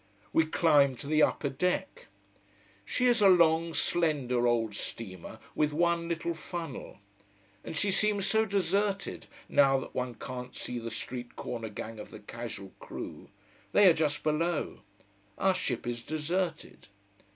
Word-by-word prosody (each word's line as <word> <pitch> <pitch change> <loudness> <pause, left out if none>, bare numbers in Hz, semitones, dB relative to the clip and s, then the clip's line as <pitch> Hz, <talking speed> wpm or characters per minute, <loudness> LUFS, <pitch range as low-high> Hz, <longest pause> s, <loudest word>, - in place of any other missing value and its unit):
We 160 -1 +4
climb 145 -5 +4
to 125 - -7
the 155 +2 +2
upper 145 - +2
deck. 180 - -2 0.8
She 250 - 0
is 240 -3 +4
a 200 - +8
long, 165 -2 +4
slender, 135 -8 +1
old 115 -3 +1
steamer 95 -3 -6 0.2
with 150 -1 +1
one 170 +1 +1
little 170 0 -1
funnel. 165 -3 -6 0.7
And 160 - -5
she 205 +3 +2
seems 205 0 +2
so 220 0 +3
deserted, 200 +1 0 0.2
now 135 -1 +5
that 130 - -6
one 125 -1 -2
can't 125 +1 -7
see 125 -1 -4
the 115 0 -5
street 120 +2 -5
corner 115 -2 -5
gang 110 +1 -7
of 105 - -8
the - - -9
casual 105 -3 -7
crew. - - -8 0.4
They 205 -1 +7
are 175 - +8
just 150 -2 0
below. 155 +2 0 0.6
Our 190 0 +3
ship 125 -10 -2
is 120 -1 -3
deserted. 160 +6 -3
155 Hz, 150 wpm, -30 LUFS, 125-175 Hz, 0.8 s, a